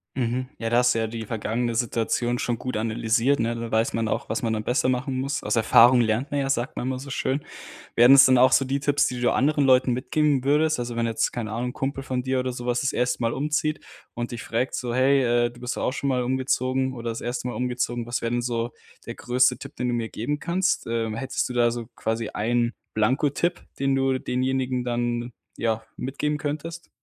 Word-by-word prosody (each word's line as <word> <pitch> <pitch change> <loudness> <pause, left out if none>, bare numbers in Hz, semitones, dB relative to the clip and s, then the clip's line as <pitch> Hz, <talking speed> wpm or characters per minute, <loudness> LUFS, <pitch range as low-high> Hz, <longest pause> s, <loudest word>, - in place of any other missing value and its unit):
Mhm. 125 +1 -1
Ja, 115 - -2
da 120 +1 +4
hast 125 0 +4
du 115 - -1
ja 110 - 0
die 115 0 -6
vergangene 115 +2 -2
Situation 120 +1 0
schon 120 -1 -1
gut 130 - -4
analysiert, 115 +4 +1
ne? 115 0 0
Da 115 0 -5
weiß 110 +1 +1
man 115 -1 -1
auch, - - -2
was 110 - -2
man 115 - 0
dann 110 -1 -2
besser 130 +2 +1
machen 130 +1 -1
muss. 140 +2 -2
„Aus 105 - -1
Erfahrung 120 +2 +6
lernt 115 +5 0
man 145 -1 0
ja,“ 135 - -2
sagt 120 -2 -1
man - - -3
immer 130 -1 -2
so 140 - -9
schön. 135 +1 -1 0.6
Wären 120 +3 +8
es 140 +1 +9
dann 130 -1 +5
auch 130 +1 +5
so 135 - +4
die 135 +1 -1
Tipps, 145 0 +2
die 125 -1 -5
du 120 - +2
anderen 145 +1 +2
Leuten 130 -1 +4
mitgeben 140 +2 +1
würdest? 155 +3 +2
Also, 120 -1 -4
wenn 115 0 0
jetzt, 115 -1 0
keine 115 -3 -4
Ahnung, 120 +3 -2
'n - - -9
Kumpel 135 +1 -3
von 130 -1 -2
dir 130 0 0
oder 130 0 -1
sowas 120 0 -2
das 135 - 0
erste 125 0 0
Mal 115 -1 0
umzieht 150 +2 -1 0.3
und 120 0 -4
dich 120 -2 -6
fragt 120 +3 -1
so: 120 -2 -3
„Hey, 135 +1 +4 0.2
äh, - - -4
du 120 - -16
bist 125 0 -4
doch - - -3
auch - - 0
schon 140 +1 -2
mal 130 -2 +1
umgezogen 130 +1 0
oder 120 -1 -4
das 115 - -5
erste 125 +1 -3
Mal 125 - -4
umgezogen. 125 -1 -2
Was 120 +1 -3
wäre 115 - -1
denn 120 0 0
so 120 -1 -2 0.4
der - - -6
größte 125 +1 +2
Tipp, 140 - -10
den 125 - -2
du 120 - 0
mir 115 -1 -2
geben 135 +8 -3
kannst?“, 180 +4 0
ähm, 115 -1 -2
hättest 135 +2 -2
du - - -5
da 120 -1 +3
so 120 -1 -5
quasi 115 0 -2
einen 120 +2 0 0.2
blanko 130 +7 +2
Tipp, 170 +5 -1 0.2
den 135 0 +2
du 135 -1 +1
denjenigen 130 0 -1
dann, 120 0 -2 0.2
ja, 110 -1 -1
mitgeben 150 +3 -2
könntest? 155 +3 -5
125 Hz, 240 wpm, -25 LUFS, 115-135 Hz, 0.6 s, es